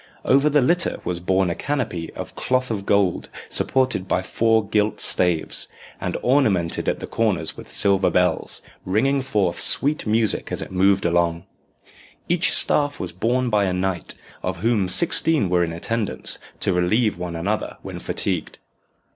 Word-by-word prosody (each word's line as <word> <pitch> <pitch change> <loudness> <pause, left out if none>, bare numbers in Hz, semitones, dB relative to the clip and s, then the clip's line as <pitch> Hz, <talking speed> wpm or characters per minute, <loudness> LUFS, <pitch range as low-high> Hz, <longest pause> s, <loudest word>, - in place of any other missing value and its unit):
Over 140 +3 +4
the 145 -2 +3
litter 170 +6 +1
was 90 -1 -2
borne 95 0 +1
a - - 0
canopy 110 - -3
of - - -7
cloth 130 -1 0
of 100 -3 -4
gold 100 -3 +1 0.2
supported 130 -8 +1
by 95 - 0
four 110 +1 +1
gilt 105 +1 0
staves, 90 -3 +2 0.3
and - - -3
ornamented 105 -11 +1
at - - -1
the - - -6
corners 100 -8 -1
with - - -11
silver 100 -2 +3
bells, 90 0 0 0.2
ringing 135 +9 +1
forth 100 -9 0
sweet 145 -3 +2
music 110 -1 +1
as - - -1
it - - -5
moved 95 +1 +2
along. 85 0 +1 0.8
Each - - +2
staff 145 -1 +2
was 90 - -4
borne 120 +6 0
by 105 -1 +3
a 95 - -1
knight, 90 -2 -3 0.3
of 90 -2 -4
whom 110 -4 +1
sixteen 160 - +2
were 90 -1 +3
in 85 - -2
attendance 105 +6 -2 0.2
to 95 - +1
relieve 95 +3 +1
one 90 -1 -5
another 100 +6 -3
when - - -7
fatigued. - - -2
100 Hz, 160 wpm, -22 LUFS, 90-125 Hz, 0.8 s, Over